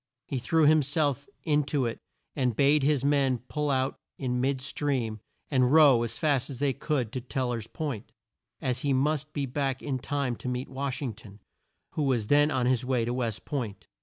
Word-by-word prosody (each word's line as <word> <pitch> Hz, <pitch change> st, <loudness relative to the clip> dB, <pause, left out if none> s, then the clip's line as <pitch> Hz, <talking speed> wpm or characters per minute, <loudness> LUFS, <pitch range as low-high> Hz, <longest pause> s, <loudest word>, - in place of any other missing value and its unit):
He 135 Hz, -, -3 dB
threw 155 Hz, +6 st, +3 dB
him 155 Hz, +1 st, +6 dB
self 145 Hz, -1 st, 0 dB, 0.2 s
in 150 Hz, -3 st, +3 dB
to 140 Hz, -2 st, 0 dB
it 115 Hz, -, -3 dB, 0.4 s
and 125 Hz, -5 st, +1 dB
bade 145 Hz, +3 st, +4 dB
his 140 Hz, -1 st, +2 dB
men 140 Hz, -3 st, +3 dB
pull 150 Hz, +5 st, -3 dB
out 130 Hz, 0 st, 0 dB, 0.2 s
in 125 Hz, -2 st, -1 dB
mid 135 Hz, +1 st, +1 dB
stream 130 Hz, -5 st, -2 dB, 0.3 s
and 130 Hz, -2 st, +3 dB
row 145 Hz, -6 st, +7 dB
as 115 Hz, 0 st, -3 dB
fast 145 Hz, -5 st, +1 dB
as 135 Hz, -, -6 dB
they 140 Hz, +1 st, +1 dB
could 130 Hz, -8 st, -1 dB
to 130 Hz, -, -4 dB
Tel 130 Hz, 0 st, -2 dB
ler's 115 Hz, -3 st, -3 dB
Point, 140 Hz, -8 st, -5 dB, 0.5 s
as 125 Hz, -1 st, -1 dB
he 140 Hz, -3 st, +1 dB
must 150 Hz, +3 st, 0 dB
be 145 Hz, -2 st, -2 dB
back 135 Hz, 0 st, -2 dB
in 135 Hz, -3 st, -2 dB
time 135 Hz, -1 st, -1 dB
to 125 Hz, -, -5 dB
meet 125 Hz, +1 st, -3 dB
Wash 135 Hz, +1 st, -3 dB
ing 125 Hz, -5 st, -2 dB
ton, 105 Hz, -1 st, -14 dB, 0.5 s
who -, -, -3 dB
was 130 Hz, -6 st, +1 dB
then 145 Hz, +5 st, +4 dB
on 130 Hz, -4 st, 0 dB
his 125 Hz, -1 st, +2 dB
way 125 Hz, -2 st, +1 dB
to 120 Hz, -, -1 dB
West 115 Hz, -4 st, -2 dB
Point. 105 Hz, -, -4 dB
135 Hz, 205 wpm, -28 LUFS, 125-145 Hz, 0.5 s, row